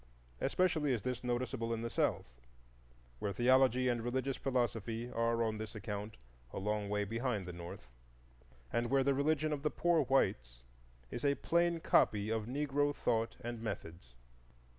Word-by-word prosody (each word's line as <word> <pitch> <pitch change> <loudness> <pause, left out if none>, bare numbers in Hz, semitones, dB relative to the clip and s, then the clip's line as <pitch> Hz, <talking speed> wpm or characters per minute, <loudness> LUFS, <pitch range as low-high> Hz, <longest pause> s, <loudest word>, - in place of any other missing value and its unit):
Especially 155 -2 +2
is 115 - -2
this 125 -1 -3
noticeable 120 -1 -1
in 115 - -5
the 115 - -2
South, - - +1 0.9
where 100 - -1
theology 130 +3 +4
and 120 -2 +1
religious 130 +3 -1
philosophy 120 -2 -1
are 115 0 +1
on 110 -1 -1
this 110 +1 -6
account 105 0 -5 0.3
a - - -7
long 105 +1 -1
way 105 0 +1
behind 115 -2 -2
the 90 - -6
North, 85 -7 -8 0.9
and 120 0 +1
where 135 0 +3
the 140 +1 +3
religion 155 +2 +1
of 145 - -3
the 150 - +1
poor 170 +1 +2
whites 65 - +1 0.5
is 120 - -5
a 140 -1 +3
plain 170 +1 +2
copy 105 -6 +3
of 110 -1 -1
Negro 145 +2 0
thought 115 -1 0
and 120 -1 -5
methods. 85 - -6
120 Hz, 160 wpm, -35 LUFS, 110-135 Hz, 0.9 s, theology